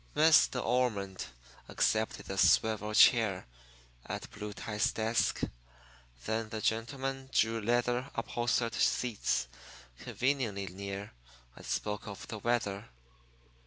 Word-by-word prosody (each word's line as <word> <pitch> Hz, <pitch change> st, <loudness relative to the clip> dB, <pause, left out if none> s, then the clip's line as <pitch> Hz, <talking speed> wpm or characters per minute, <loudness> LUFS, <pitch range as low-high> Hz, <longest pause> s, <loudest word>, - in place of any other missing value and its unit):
Miss 155 Hz, 0 st, +6 dB
De 125 Hz, -, -4 dB
Ormond 110 Hz, -7 st, -1 dB, 0.4 s
accepted 110 Hz, 0 st, 0 dB
the 95 Hz, -, -5 dB
swivel 105 Hz, +2 st, +3 dB
chair 105 Hz, -7 st, +5 dB, 0.6 s
at -, -, -6 dB
Blue 105 Hz, 0 st, -6 dB
Tie's 105 Hz, +1 st, -1 dB
desk. 110 Hz, +1 st, 0 dB, 0.8 s
Then 110 Hz, 0 st, -2 dB
the 110 Hz, -, -4 dB
gentlemen 130 Hz, +5 st, -2 dB
drew 115 Hz, -1 st, +2 dB
leather 120 Hz, +3 st, 0 dB
upholstered 120 Hz, 0 st, 0 dB
seats 120 Hz, -2 st, 0 dB, 0.5 s
conveniently 125 Hz, -7 st, -1 dB
near, 100 Hz, +2 st, -6 dB, 0.4 s
and -, -, -13 dB
spoke 105 Hz, 0 st, -3 dB
of 100 Hz, -1 st, -8 dB
the 110 Hz, -, -5 dB
weather. 105 Hz, -, -1 dB
110 Hz, 110 wpm, -31 LUFS, 105-120 Hz, 0.8 s, Miss